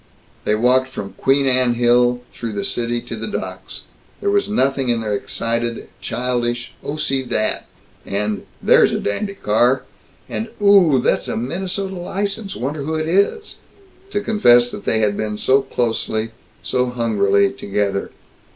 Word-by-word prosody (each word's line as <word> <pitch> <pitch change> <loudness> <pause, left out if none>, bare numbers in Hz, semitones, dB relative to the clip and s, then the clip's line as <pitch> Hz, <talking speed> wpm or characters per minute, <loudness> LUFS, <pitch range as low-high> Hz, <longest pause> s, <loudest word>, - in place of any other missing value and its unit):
They 105 - +2
walked 125 +3 +3
from 100 -7 -7
Queen 135 +6 +2
Anne 130 -2 +3
Hill 120 +1 +3
through 115 -2 -5
the 100 -1 -2
city 120 0 -1
to 115 - -6
the 110 0 -3
docks. - - -6 0.4
There 405 - 0
was 405 0 +1
nothing 135 -8 +1
in 115 -1 +1
their 105 -2 -2
excited, 115 +3 -2
childish, 120 -1 -2
"Oh, 145 - -3
see 135 -3 0
that!" 110 -4 -1 0.4
and 105 +1 -2 0.2
"There's - - +5
a - - 0
dandy 200 - -2
car!" 120 - +2 0.4
and 225 - -3
"Ohhhhh, 190 -11 +5
that's - - +1
a - - -2
Minnesota 190 - -3
license 200 +3 -3
wonder 140 +4 -3
who 160 +3 -2
it 155 0 -1
is?" 200 - +1 0.5
to 205 - -1
confess 120 - +4
that - - -8
they 110 - +2
had 105 -1 +2
been 105 0 -3
so 130 +6 +3
closely, 115 -3 -2 0.3
so 125 0 +1
hungrily 100 -5 +2
together. 100 0 -2
125 Hz, 155 wpm, -20 LUFS, 110-150 Hz, 0.5 s, There's